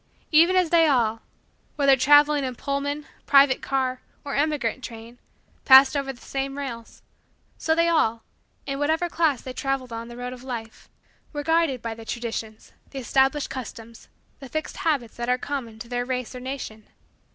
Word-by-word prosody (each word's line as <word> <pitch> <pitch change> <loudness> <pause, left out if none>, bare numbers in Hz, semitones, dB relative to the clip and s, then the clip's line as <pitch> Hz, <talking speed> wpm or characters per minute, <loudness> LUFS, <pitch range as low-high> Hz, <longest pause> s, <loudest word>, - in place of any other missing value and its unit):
Even 335 +4 +5
as 365 -3 +2
they 330 -2 +5
all, 230 -5 +1 0.5
whether 275 -2 +5
traveling 290 +2 +5
in 255 -1 -3
Pullman, 285 +2 -3 0.2
private 275 -2 +5
car, 260 -2 -1 0.2
or 280 - -4
emigrant 280 -5 0
train, 230 +1 -9 0.4
passed 265 +1 +8
over 275 -1 -1
the 250 - -14
same 275 +1 -4
rails, 235 -5 -7 0.6
so 320 - +1
they 335 +1 +3
all, 230 -9 +1 0.4
in 275 0 -4
whatever 320 +4 +1
class 315 -7 +1
they 255 - -6
traveled 265 -2 -3
on 230 0 -6
the 240 0 -10
road 250 0 -5
of 250 - -11
Life, 230 -4 -7 0.4
were 290 -1 -3
guided 325 -5 +1
by 230 -1 -3
the 225 0 -11
Traditions 225 -1 -6 0.2
the 275 - -9
established 270 +3 +1
customs 230 -3 -8 0.3
the 270 -3 -10
fixed 310 +2 -4
habits 280 -8 -1
that 240 0 -3
are 250 - +3
common 255 -5 -5
to 225 - -9
their 245 0 -2
race 250 -1 -3
or 250 - -7
nation. 250 -5 -7
265 Hz, 175 wpm, -24 LUFS, 240-290 Hz, 0.6 s, passed